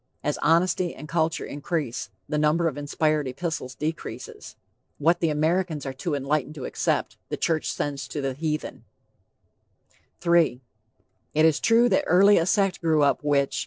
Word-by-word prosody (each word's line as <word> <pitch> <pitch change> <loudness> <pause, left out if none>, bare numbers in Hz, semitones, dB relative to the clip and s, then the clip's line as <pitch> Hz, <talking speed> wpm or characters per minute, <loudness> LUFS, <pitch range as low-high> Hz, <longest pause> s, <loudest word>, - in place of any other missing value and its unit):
As 150 - -1
honesty 175 +2 +2
and 155 - -9
culture 160 0 0
increase, 145 -3 -3 0.2
the 150 +1 -1
number 155 +3 +2
of 155 - -2
inspired 150 0 0
epistles 130 -1 -4
decreases. 155 +3 -6 0.4
What 165 +4 +2
the 165 - +1
Americans 160 +1 0
are 135 - -4
too 145 +4 -3
enlightened 145 +2 -1
to 135 - -6
accept, - - -1
the - - -3
church 160 -2 0
sends 140 -1 -3
to 150 - -5
the 135 -1 -2
heathen. 155 +2 -4 1.4
III. 170 -7 +3 0.8
"It 155 +1 +5
is 160 -1 +3
true 230 +1 +4
that 290 +3 +2
early 200 +2 +6
a 165 - 0
sect 195 -1 +1
grew 160 -3 +3
up 145 - +2
which.... 140 -2 +1
155 Hz, 160 wpm, -25 LUFS, 145-170 Hz, 1.4 s, early